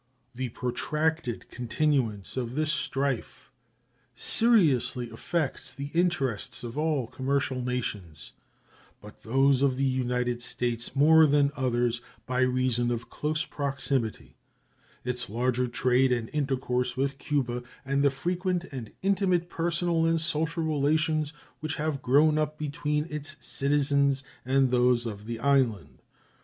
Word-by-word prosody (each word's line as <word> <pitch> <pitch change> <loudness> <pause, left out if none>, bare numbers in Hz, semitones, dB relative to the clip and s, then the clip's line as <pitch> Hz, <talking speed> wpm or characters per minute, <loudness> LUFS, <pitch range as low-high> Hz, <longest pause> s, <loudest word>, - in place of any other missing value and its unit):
The 125 +1 -3
protracted 150 +2 -2
continuance 125 -5 -1
of 125 -1 -3
this 155 0 +1
strife 140 -3 -2 0.6
seriously 140 - +3
affects 170 -6 -2
the 140 +1 -6
interests 165 - 0
of 120 -1 -6
all 150 -4 0
commercial 130 +1 -1
nations, 105 -11 -4 0.7
but 105 0 -14
those 135 +3 +3
of 135 -2 +3
the 135 - -1
United 125 -2 0
States 120 0 -3
more 160 +3 +7
than 145 0 +3
others, 120 -2 0 0.2
by 125 0 -1
reason 130 -2 +2
of 120 -1 -4
close 155 +1 -1
proximity, 135 -5 -2 0.7
its 125 -3 -2
larger 125 +3 0
trade 125 +2 +2
and 120 -2 -1
intercourse 130 -3 -1
with 135 +1 -1
Cuba, 125 -5 -1 0.2
and 140 +1 +1
the 140 - +5
frequent 180 +5 -1
and 125 -5 -7
intimate 185 -3 +1
personal 170 0 +1
and 165 0 +2
social 160 +1 -1
relations 155 0 +1 0.3
which 155 0 -3
have 150 -3 -2
grown 150 +4 +4
up 155 0 -1
between 150 0 -1
its 150 0 -4
citizens 140 -1 +1 0.2
and 130 0 +2
those 125 -1 +3
of 105 -2 -6
the 115 0 -3
island. 125 -7 +1
135 Hz, 125 wpm, -28 LUFS, 125-155 Hz, 0.7 s, more